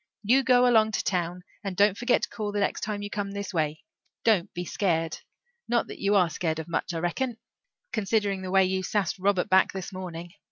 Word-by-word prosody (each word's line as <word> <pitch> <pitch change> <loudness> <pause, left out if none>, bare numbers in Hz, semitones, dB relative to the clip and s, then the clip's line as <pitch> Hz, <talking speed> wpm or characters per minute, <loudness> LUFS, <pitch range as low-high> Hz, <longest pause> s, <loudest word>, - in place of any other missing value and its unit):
You 250 +6 +4
go 250 -1 +4
along 220 -2 +4
to - - 0
town 180 -1 -1 0.2
and 195 -3 -4
don't 205 -1 +4
forget 245 +3 +1
to - - -1
call 210 -2 -4
the 205 - -2
next 200 - 0
time 205 -1 -3
you 205 - -6
come 205 -1 -2
this 200 0 -5
way. 155 +1 -1 0.4
Don't 200 -4 +3
be 175 0 -5
scared. 165 -4 -1 0.5
Not 240 -1 +2
that - - -8
you 200 +1 +2
are 185 -3 +5
scared 160 0 -1
of 160 - -5
much, 170 - -2
I 170 - -3
reckon, 215 +9 -2 0.6
considering 205 -3 0
the 185 - -5
way 190 0 +5
you 190 0 0
sassed 190 -1 -1
Robert 195 -1 +2
back 190 0 +4
this 190 +1 -6
morning. 175 -2 -7
195 Hz, 215 wpm, -27 LUFS, 175-210 Hz, 0.6 s, are